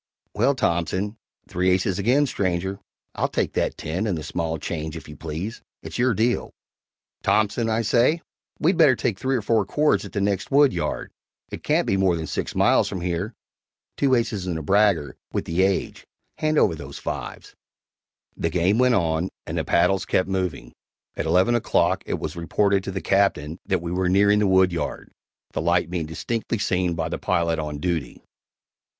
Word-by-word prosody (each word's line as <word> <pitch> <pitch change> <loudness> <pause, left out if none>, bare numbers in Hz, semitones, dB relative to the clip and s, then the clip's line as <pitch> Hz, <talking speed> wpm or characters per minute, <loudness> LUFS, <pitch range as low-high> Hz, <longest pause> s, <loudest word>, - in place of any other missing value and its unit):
"Well - - +2
Thompson 95 +5 -1 0.3
(Three 90 +1 0
aces 95 0 +1
again, 125 +8 +3
stranger 95 -4 -2 0.3
I'll - - 0
take - - -1
that - - 0
X - - -9 0.2
and 95 -5 -1
the 75 - -5
small 80 0 -2
change, 80 0 -4
if 80 - -10
you 75 - -10
please. 80 +9 -5 0.2
It's - - -6
your 125 -2 +3
deal) 120 +4 +1 0.7
Thompson, 105 +3 +1
I 110 +1 +1
say, 125 +9 +2 0.3
we'd 170 +3 +2
better 150 -6 +6
take 115 -5 -2
three 130 0 0
or 115 - -1
four 110 0 +2
cords 100 -1 +1
at - - -9
the 100 - -1
next 100 -1 0
woodyard 140 -1 +2 0.4
it - - -6
can't - - +1
be 95 - +1
more 95 -2 +3
than 80 -1 -4
six - - -4
miles - - +4
from 90 - -4
here 90 +5 -2 0.6
(Two 135 -2 +3
aces 105 -6 -1
and 85 -3 -1
a 80 - -5
bragger, 100 -4 +2 0.2
with - - -1
the 85 +3 0
age! 95 0 0 0.3
Hand 155 0 +1
over 95 - +4
those 70 -3 -8
V's)." - - -6 0.8
The 85 - -1
game 90 +6 +2
went 125 -1 +4
on, 85 -1 0 0.2
and - - -5
the - - 0
paddles 95 +3 +2
kept 95 - +1
moving. 90 -10 -3 0.4
At - - -3
eleven 95 +6 +3
o'clock 120 - +2
it - - -1
was - - -5
reported 95 +4 +1
to - - -3
the 95 -1 -4
Captain 85 -4 +1
that 95 -3 0
we 85 - -4
were 90 0 0
nearing 100 +2 +4
the 105 - +2
woodyard, 90 -5 +1 0.4
the - - -1
light 85 +1 +1
being 85 -4 -2
distinctly 115 +8 -3
seen 90 -4 0
by 80 -2 -2
the - - -4
pilot 85 -3 0
on 75 -1 -4
duty. 80 -4 -3
95 Hz, 185 wpm, -24 LUFS, 85-105 Hz, 0.8 s, better